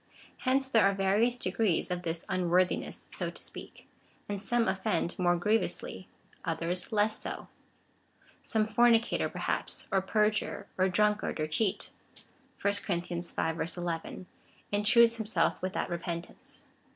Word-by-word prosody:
Hence 265 +1 +3
there 230 -5 +4
are 200 - -1
various 205 +6 +2
degrees 185 -3 0
of 180 0 -1
this 165 -1 -3
unworthiness, 180 0 0
so - - -2
to - - -10
speak; - - -9 0.4
and 205 -1 -4
some 235 +3 +1
offend 190 -2 -1
more 175 -1 +3
griev 215 +5 +3
ously, - - -5 0.4
others 180 +4 -1
less 215 0 +2
so. - - -5 0.9
Some 220 -1 +1
fornicator, 230 +1 +3
perhaps, - - -1
or 195 - +3
perjurer, 210 +2 0
or 185 0 +2
drunkard, 210 0 +1
or 155 - +1
cheat, 185 +6 -1 0.7
(1 200 0 +1
Cor. 195 - +2
v. 170 0 -3 0.6
11,) 175 +1 -4 0.5
intrudes 230 +3 +5
himself 210 -7 0
without 185 +1 -2
repentance. 170 0 -6
195 Hz, 130 wpm, -30 LUFS, 175-220 Hz, 0.9 s, intrudes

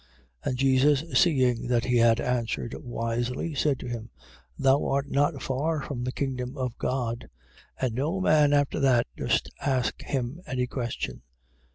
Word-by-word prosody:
12:34. - - +1
And 125 - -2
Jesus 135 +2 +4
seeing 130 -9 +3
that 120 0 +1
he 125 -1 +2
had 115 0 +5
answered 120 -1 -1
wisely, 120 +5 -3
said 140 0 +1
to - - -6
him: 120 -1 -5 0.5
Thou 135 +1 +3
art 140 +1 0
not 145 0 +1
far 145 +3 -1
from 125 -4 -4
the 125 - -1
kingdom 130 0 -3
of 125 -2 -2
God. 120 -2 -2 0.5
And 130 -3 0
no 150 +10 -1
man 150 -5 +4
after 145 0 +2
that 130 -4 +4
durst - - 0
ask 130 -3 0
him 135 +4 -3
any 125 -1 0
question. 120 -2 -4
130 Hz, 160 wpm, -27 LUFS, 120-140 Hz, 0.5 s, had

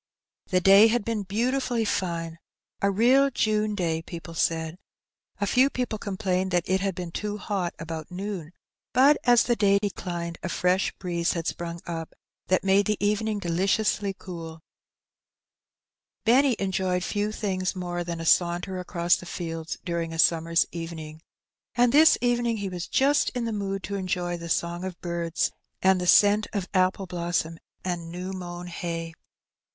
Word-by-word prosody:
The 185 - +2
day 195 +4 +8
had 230 -1 0
been 225 -2 -1
beautifully 235 +4 0
fine 170 -4 -2 0.2
— - - -51
a 200 - +3
real 250 +7 +4
June 215 -4 0
day, 165 -4 -1
people 165 0 -9
said; 160 +1 -1 0.6
a 200 - +1
few 255 +6 +4
people 250 -5 -3
complained 190 -2 -1
that 175 -2 0
it 190 +1 +1
had 195 -2 -1
been 175 -1 -5
too 210 +3 -3
hot 195 -4 -3
about 160 -1 -6
noon, 185 -3 -5 0.4
but 275 +4 +6
as 240 -2 +6
the 240 - +1
day 200 -2 +4
declined 175 -4 -4
a 185 - -4
fresh 180 +2 +1
breeze 170 -2 -1
had 165 -2 -3
sprung 170 -1 -4
up, 165 -2 -6 0.3
that 185 - +2
made 195 +1 +3
the 210 -1 +1
evening 210 +1 0
deliciously 200 +3 0
cooL 165 -4 -9 1.6
Benny 255 +2 +5
enjoyed 185 -2 -1
few 205 +2 -1
things 190 -4 -2
more 175 -1 -3
than 170 -1 -5
a 165 - -5
saunter 175 +3 +2
across 175 -1 +1
the 180 - -10
fields 165 -2 -5
during 170 -1 -2
a - - -5
summer's 165 0 +3
evening. 160 -2 -7 0.5
And 245 -1 +3
this 315 +2 +7
evening 240 -2 +1
he 200 -2 -3
was 180 -1 -5
just 280 +2 +3
in 245 -1 -1
the 230 - -2
mood 195 -2 -3
to 200 - -5
enjoy 180 -2 -2
the 170 -1 -7
song 170 +1 -1
of 185 -2 -6
birds, 170 -1 -1 0.3
and 190 -1 +4
the 180 - -2
scent 205 +3 +5
of 195 -3 -2
apple 185 +1 +2
blossom 170 -2 -2 0.3
and 170 -2 -3
new 180 +2 -5
mown 175 -1 -6
hay. 165 -1 -5
185 Hz, 165 wpm, -26 LUFS, 170-210 Hz, 1.6 s, day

